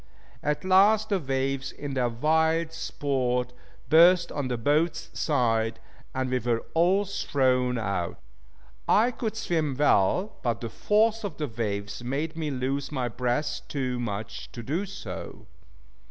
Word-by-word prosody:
At 150 Hz, +4 st, -1 dB
last 205 Hz, +3 st, +5 dB
the 200 Hz, -2 st, +2 dB
waves, 135 Hz, -1 st, -2 dB
in 145 Hz, -1 st, -6 dB
their 125 Hz, -2 st, +1 dB
wild 160 Hz, +6 st, +1 dB
sport, 125 Hz, -6 st, -1 dB, 0.3 s
burst 170 Hz, +2 st, +6 dB
on 145 Hz, -3 st, -2 dB
the 125 Hz, -1 st, -2 dB
boat's 150 Hz, +8 st, 0 dB
side, 115 Hz, -6 st, +1 dB, 0.4 s
and 130 Hz, -1 st, -1 dB
we 130 Hz, -, +2 dB
were 115 Hz, -1 st, -1 dB
all 185 Hz, +5 st, +3 dB
thrown 130 Hz, -9 st, +1 dB
out. 100 Hz, -6 st, -2 dB, 0.7 s
I 235 Hz, +4 st, +4 dB
could 225 Hz, -2 st, -4 dB
swim 160 Hz, -9 st, 0 dB
well, 150 Hz, -, +2 dB
but 120 Hz, -3 st, -1 dB
the 115 Hz, -, -4 dB
force 220 Hz, -, +2 dB
of 185 Hz, -8 st, -5 dB
the 150 Hz, -, -2 dB
waves 105 Hz, -2 st, -4 dB
made 145 Hz, +6 st, -2 dB
me 160 Hz, -2 st, -2 dB
lose 135 Hz, +1 st, -2 dB
my 130 Hz, -4 st, -1 dB
breath 125 Hz, +5 st, -1 dB
too 130 Hz, -3 st, -2 dB
much 105 Hz, -3 st, -5 dB
to 120 Hz, -, -7 dB
do 165 Hz, -, -2 dB
so. 195 Hz, -, -8 dB
140 Hz, 145 wpm, -27 LUFS, 125-165 Hz, 0.7 s, burst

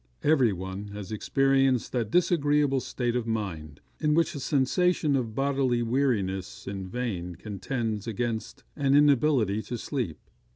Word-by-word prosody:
Every 140 Hz, -7 st, +4 dB
one 95 Hz, +2 st, -5 dB
has 105 Hz, -2 st, -7 dB
experienced 135 Hz, +3 st, +2 dB
that 120 Hz, -4 st, -1 dB
disagreeable 145 Hz, -4 st, +2 dB
state 120 Hz, -1 st, -2 dB
of 120 Hz, -2 st, -1 dB
mind, 85 Hz, -10 st, -4 dB, 0.2 s
in 150 Hz, -1 st, +2 dB
which 165 Hz, 0 st, +2 dB
a 145 Hz, -, -5 dB
sensation 145 Hz, +3 st, +2 dB
of 115 Hz, -5 st, -2 dB
bodily 135 Hz, -3 st, +1 dB
weariness 110 Hz, -7 st, -1 dB
in 95 Hz, -1 st, -5 dB
vain 95 Hz, -6 st, -4 dB
contends 110 Hz, +1 st, -4 dB
against 115 Hz, 0 st, -3 dB
an 140 Hz, -1 st, +2 dB
inability 140 Hz, -7 st, +3 dB
to 120 Hz, -, -5 dB
sleep. 120 Hz, -, -3 dB
120 Hz, 135 wpm, -27 LUFS, 105-140 Hz, 0.2 s, Every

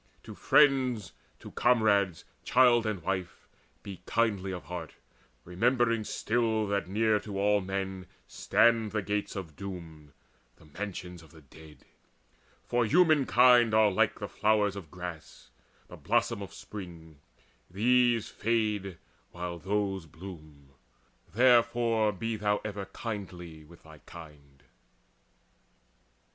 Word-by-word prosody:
To -, -, -10 dB
friends, 130 Hz, -7 st, +2 dB, 0.3 s
To -, -, -11 dB
comrades, 100 Hz, -8 st, +2 dB, 0.2 s
child 120 Hz, -2 st, +4 dB
and 100 Hz, -6 st, -3 dB
wife, 95 Hz, -1 st, -4 dB, 0.4 s
be 95 Hz, -3 st, -9 dB
kindly 100 Hz, -5 st, 0 dB
of 90 Hz, -1 st, -6 dB
heart, 90 Hz, -3 st, -8 dB, 0.5 s
Remembering 115 Hz, +4 st, +1 dB
still 110 Hz, -1 st, 0 dB
that 100 Hz, -3 st, -1 dB
near 105 Hz, +2 st, +1 dB
to 100 Hz, -2 st, -6 dB
all 105 Hz, 0 st, +2 dB
men 95 Hz, 0 st, -4 dB, 0.2 s
stand 115 Hz, -2 st, +2 dB
The 105 Hz, -2 st, -1 dB
gates 105 Hz, +1 st, -3 dB
of 85 Hz, -6 st, -7 dB
doom, 80 Hz, -6 st, -9 dB, 0.4 s
the -, -, -20 dB
mansions 90 Hz, +1 st, -7 dB
of 80 Hz, -, -17 dB
the 80 Hz, -, -17 dB
dead: 75 Hz, +2 st, -17 dB, 0.8 s
For 120 Hz, 0 st, +1 dB
humankind 125 Hz, -6 st, +4 dB
are 110 Hz, -1 st, +5 dB
like 95 Hz, -, +1 dB
the -, -, -5 dB
flower 105 Hz, -1 st, +2 dB
of 95 Hz, -5 st, -9 dB
grass, 85 Hz, -7 st, -9 dB, 0.4 s
The -, -, -12 dB
blossom -, -, 0 dB
of -, -, -8 dB
spring; 85 Hz, -7 st, -10 dB, 0.5 s
these 120 Hz, +3 st, +2 dB
fade 110 Hz, -2 st, -1 dB
the 95 Hz, -3 st, -8 dB, 0.3 s
while 85 Hz, 0 st, -6 dB
those 95 Hz, -2 st, -2 dB
bloom: 80 Hz, -5 st, -12 dB, 0.6 s
Therefore 115 Hz, -2 st, +3 dB
be 110 Hz, +3 st, -4 dB
ever 105 Hz, -1 st, -2 dB
kindly 90 Hz, -7 st, -8 dB
with 85 Hz, +2 st, -18 dB
thy 80 Hz, -1 st, -15 dB
kind. 75 Hz, -4 st, -14 dB
100 Hz, 120 wpm, -29 LUFS, 90-115 Hz, 0.8 s, are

